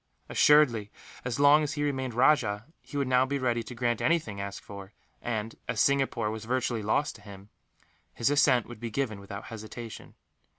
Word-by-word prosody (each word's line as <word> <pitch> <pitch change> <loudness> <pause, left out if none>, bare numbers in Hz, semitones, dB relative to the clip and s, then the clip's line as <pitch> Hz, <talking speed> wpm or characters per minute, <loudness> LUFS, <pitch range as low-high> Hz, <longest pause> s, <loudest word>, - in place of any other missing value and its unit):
Assuredly, 125 -9 +4 0.3
as 125 +1 -3
long 145 +2 +7
as 150 -1 -2
he 145 -1 -2
remained 130 -4 -2
rajah, 115 -5 +3 0.2
he 145 - -8
would 140 -2 0
now 130 0 +4
be 140 +2 -1
ready 120 -3 0
to 120 +2 -9
grant 120 -1 0
anything 150 -12 0
asked 100 0 -6
for 100 0 -10 0.3
and, 110 -1 -3
as - - -2
Singapore 135 -6 +2
was 110 0 -6
virtually 125 -1 -1
lost 125 +8 0
to - - -19
him, 100 -1 -12 0.6
his 120 +4 0
assent 140 -4 +4
would 120 -2 -11
be 120 0 -4
given 110 -3 -2
without 100 +1 -8
hesitation. 110 +1 -9
120 Hz, 180 wpm, -28 LUFS, 110-140 Hz, 0.6 s, long